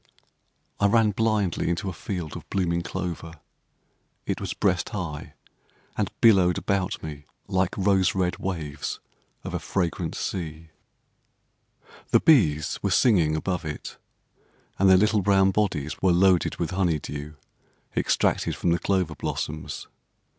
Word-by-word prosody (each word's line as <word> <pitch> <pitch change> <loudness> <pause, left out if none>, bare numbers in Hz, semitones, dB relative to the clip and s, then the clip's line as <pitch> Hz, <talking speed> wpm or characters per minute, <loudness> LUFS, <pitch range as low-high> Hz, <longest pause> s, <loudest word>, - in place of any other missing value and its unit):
I 100 - +4
ran 110 0 +4
blindly 105 -6 0
into 85 +3 -2
a 95 - -3
field 85 -2 -5
of - - -9
blooming 85 -3 0
clover. 85 -2 -5 0.9
It - - -2
was - - -4
breast - - +1
high, 85 -8 -5 0.6
and - - -1
billowed 95 -6 +5
about 100 -2 -1
me 75 -2 -7 0.2
like 95 0 0
rose 95 -1 +2
red 90 -2 0
waves 80 -7 -4 0.4
of - - -6
a - - -1
fragrant 85 -5 -2
sea. 80 -3 -5 1.4
The - - +5
bees 80 - +3
were - - 0
singing 85 -11 +3
above 90 +3 -2
it; 75 -2 -6 0.8
and 95 0 +5
their 95 - +8
little 105 +1 +3
brown 95 0 +4
bodies 90 -8 -1
were 95 - +4
loaded 90 0 +3
with 85 - -3
honey 90 -4 +1
dew, 75 +1 -7 0.6
extracted - - +1
from 85 - 0
the 85 - +2
clover 95 -5 0
blossoms. 75 +1 -4
90 Hz, 135 wpm, -25 LUFS, 80-95 Hz, 1.4 s, their